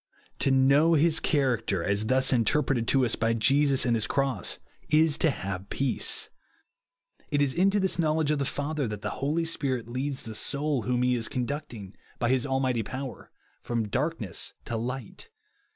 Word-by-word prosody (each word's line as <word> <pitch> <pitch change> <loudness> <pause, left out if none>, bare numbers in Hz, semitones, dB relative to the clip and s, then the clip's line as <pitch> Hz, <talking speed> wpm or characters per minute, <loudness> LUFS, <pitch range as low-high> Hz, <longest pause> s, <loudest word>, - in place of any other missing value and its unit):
To - - +2
know 140 +5 +4
his 160 +1 +3
character 115 - 0
as 100 +3 0
thus 130 +1 +2
interpreted 120 0 +1
to 135 -2 +3
us 115 - 0
by 115 +1 +1
Jesus 140 +4 +3
and 120 -1 +2
his 110 -1 -1
cross, 135 -8 -1 0.3
is 155 0 +4
to 165 - +4
have 95 -6 -5
peace. 135 -1 0 1.0
It 145 - 0
is 140 -2 +2
into 195 +3 +3
this 190 -2 0
knowledge 155 -2 +1
of 150 - 0
the - - +1
Father 145 0 -2
that 105 -1 -6
the 105 - -2
Holy 155 +4 0
Spirit 130 -7 -1
leads 130 +3 -3
the 110 - -7
soul 140 +5 0
whom 125 +1 0
he 125 0 +2
is 115 -2 -1
conducting, 125 -6 -4 0.2
by 120 - 0
his 130 +1 +1
almighty 130 -3 0
pov/er, 130 +1 -7 0.3
from 115 -3 -2
darkness 130 - -2
to 120 - -3
light. 120 +1 -5
130 Hz, 170 wpm, -27 LUFS, 115-145 Hz, 1.0 s, know